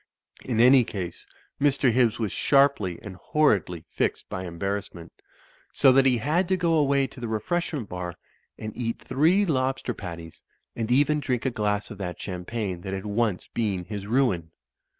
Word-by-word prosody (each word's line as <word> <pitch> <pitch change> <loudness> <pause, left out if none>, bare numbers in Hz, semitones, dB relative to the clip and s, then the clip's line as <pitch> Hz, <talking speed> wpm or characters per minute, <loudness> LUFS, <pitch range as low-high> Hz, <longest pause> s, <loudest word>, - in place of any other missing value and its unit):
In 120 -3 -2
any 125 +2 +7
case, 90 -6 -6 0.3
Mr. 140 -3 +3
Hibbs 120 -2 +2
was 110 -5 -2
sharpy 135 - +2
and 95 -4 -8
hor 150 - +3
ridly 85 -1 -9
fixed - - -1
by 95 0 -4
embarrassment; 90 0 -5 0.6
so 135 - +5
that 135 +1 +5
he 125 -2 +3
had 155 - +1
to 185 +1 +1
go 170 -2 +1
away 140 -3 +3
to 135 - -11
the 120 - -4
refreshment 130 +3 -2
bar 90 -1 -5 0.4
and 110 -1 -7
eat 115 -2 -3
three 165 +10 +2
lobster 130 -5 -1
patties, 85 -5 -9 0.3
and 115 -1 -3
even 145 +4 +3
drink 125 -4 -2
a 130 - +1
glass 105 -1 -1
of 105 - -9
that 90 -2 -5
champagne 95 0 -4
that 95 +1 -5
had 95 +1 -6
once 105 -2 -1
been 100 -6 -1
his 100 -1 -6
ruin. 110 -9 +1
115 Hz, 170 wpm, -26 LUFS, 95-135 Hz, 0.6 s, any